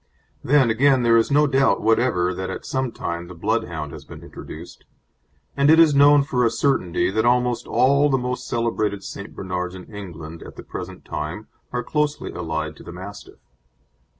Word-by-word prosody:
Then, 135 -3 +4
again, 130 +2 +3
there 115 -1 +4
is 115 -1 +3
no 145 +1 +4
doubt 135 -1 +2
whatever 110 -5 +2
that 95 +1 -4
at - - -6
some 130 -2 -2
time 85 -5 -5
the 90 - -10
Bloodhound 85 -6 -2
has 75 -2 -10
been - - -12
introduced, - - -10 0.7
and 140 +1 +3
it 160 - +7
is 160 -3 +6
known 145 0 +6
for 125 -3 0
a 115 - +4
certainty 90 -10 0
that 110 +2 +1
almost 125 0 +1
all 140 +3 +3
the 135 - +2
most 125 0 -4
celebrated 110 -4 -1
St. 100 +1 -8
Bernards 90 -1 -4
in 90 - -9
England 85 -5 -8
at - - -11
the - - -10
present - - -8
time 80 +8 -5 0.2
are 125 0 -2
closely 150 +3 -1
allied 80 -2 -4
to - - -13
the - - -9
Mastiff. 95 +4 -10
115 Hz, 180 wpm, -22 LUFS, 90-135 Hz, 0.7 s, it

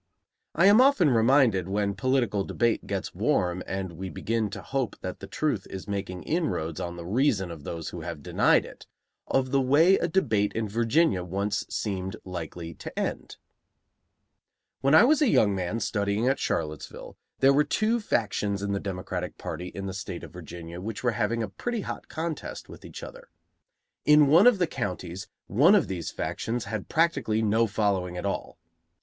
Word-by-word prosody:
I 170 - +4
am 205 +5 +7
often 255 - +5
reminded, 115 -6 +3
when 100 0 0
political 120 -3 +1
debate 115 +3 0
gets - - -3
warm 90 0 0
and 95 -1 -3
we 95 +3 -6
begin 110 +2 -1
to - - -8
hope 135 -4 -2
that 90 - -5
the - - -8
truth 140 -11 -1
is 95 +1 -7
making 95 -3 -4
inroads 95 - -1
on 85 -1 -4
the 85 -1 -8
reason 105 -3 +1
of 80 -3 -9
those 85 -2 -5
who - - -7
have 70 - -6
denied - - +3
it, - - -13 0.4
of 130 -1 0
the 135 -1 +3
way 155 +9 +5
a - - 0
debate 110 - +1
in 110 -1 -2
Virginia 115 - +2
once 100 +3 -2
seemed 95 -3 -3
likely 85 -2 -6
to - - -10
end: - - -3 1.4
When 140 +3 +4
I - - +9
was 300 +5 +4
a 290 - +4
young 105 - +4
man 95 +4 -2
studying 105 +1 0
at 135 - +2
Charlottesville, 75 -3 -4 0.2
there 135 +1 +5
were 145 +2 +4
two 220 +8 +1
factions 105 - -1
in 100 - -1
the 100 - 0
Democratic 90 -2 -5
party 85 +3 -5
in 100 +1 -6
the 95 - -4
State 95 -2 -6
of - - -10
Virginia 85 0 -8
which 110 +4 -5
were 120 - +3
having 115 +1 -1
a - - -2
pretty 235 - -4
hot - - -6
contest 160 -1 -5
with - - -12
each 465 - -9
other. - - -10 0.8
In 150 0 +7
one 165 - +6
of 245 -4 +6
the 180 - +2
counties 95 - -5 0.2
one 150 - +5
of 190 - +3
these 90 -3 -4
factions 115 -1 -3
had 110 -3 -5
practically 140 -10 +1
no 110 +2 +3
following 100 -4 -1
at 90 - -4
all. 100 - -3
105 Hz, 180 wpm, -27 LUFS, 95-140 Hz, 1.4 s, I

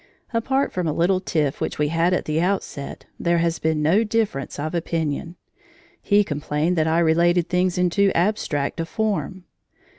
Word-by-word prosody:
Apart 265 +4 0
from 180 -2 -1
a 155 - 0
little 180 +4 +2
tiff 155 -6 -1
which - - -2
we 150 0 +1
had 165 +2 +2
at 180 - 0
the 155 +1 0
outset, 180 -6 -3
there 170 0 +2
has 165 0 0
been 160 -1 0
no 185 +9 +4
difference 210 - -2
of 155 +3 -3
opinion. 165 -1 -2 0.7
He 205 0 +3
complained 150 +1 -1
that 160 -2 +1
I 160 +1 +2
related 170 +1 +3
things 180 0 +1
in 180 -1 +2
too 200 +1 +3
abstract 170 -6 0
a 165 - -1
form. 190 -4 -2
170 Hz, 175 wpm, -22 LUFS, 155-185 Hz, 0.7 s, no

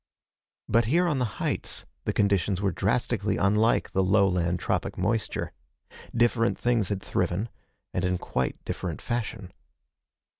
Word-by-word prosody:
But 115 +1 +3
here 170 +9 +3
on 150 -5 +1
the 115 -6 -2
heights - - -2 0.2
the - - +1
conditions 100 -2 +2
were 100 -1 +1
drastically - - 0
unlike 105 +4 +3
the 95 - +2
lowland 90 -3 +3
tropic - - -1
moisture. 110 +5 -1 0.6
Different 120 0 +3
things 120 -5 +1
had 100 -2 -2
thriven, 90 +5 -1 0.4
and 90 - -1
in 90 0 +1
quite 65 -6 -2
different - - -3
fashion. 110 -5 -3
100 Hz, 135 wpm, -27 LUFS, 90-115 Hz, 0.6 s, But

